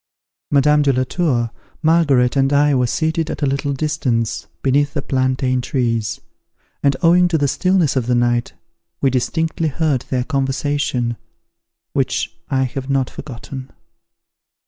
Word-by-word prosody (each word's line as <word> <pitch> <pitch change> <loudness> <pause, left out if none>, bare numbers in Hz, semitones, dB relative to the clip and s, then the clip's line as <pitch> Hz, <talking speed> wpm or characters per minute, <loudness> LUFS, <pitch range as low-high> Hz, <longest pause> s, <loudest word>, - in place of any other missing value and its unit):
Madame 150 +1 +4
de 140 -1 +3
la 130 0 +1
Tour, 125 -6 0 0.3
Margaret, 145 -7 +3
and 135 0 +2
I, 145 0 +4
were 125 -2 +2
seated 160 +4 -1
at - - -4
a - - +4
little 140 +1 -1
distance, 135 -6 -1 0.2
beneath 145 +2 +2
the 145 - 0
plantain 130 -1 0
trees; 120 -5 -1 0.6
and, 140 -2 +2
owing 175 +2 +5
to 170 -2 +1
the 145 -2 +1
stillness 180 -1 +1
of 125 -3 0
the 125 - +2
night, 120 0 +1 0.5
we 135 - +2
distinctly 160 +5 0
heard 150 -3 0
their 125 -2 0
conversation, 135 -3 -1 0.8
which - - -1
I 135 -2 +1
have 130 +1 -4
not 135 -2 0
forgotten. 130 0 -8
135 Hz, 145 wpm, -19 LUFS, 125-150 Hz, 0.8 s, owing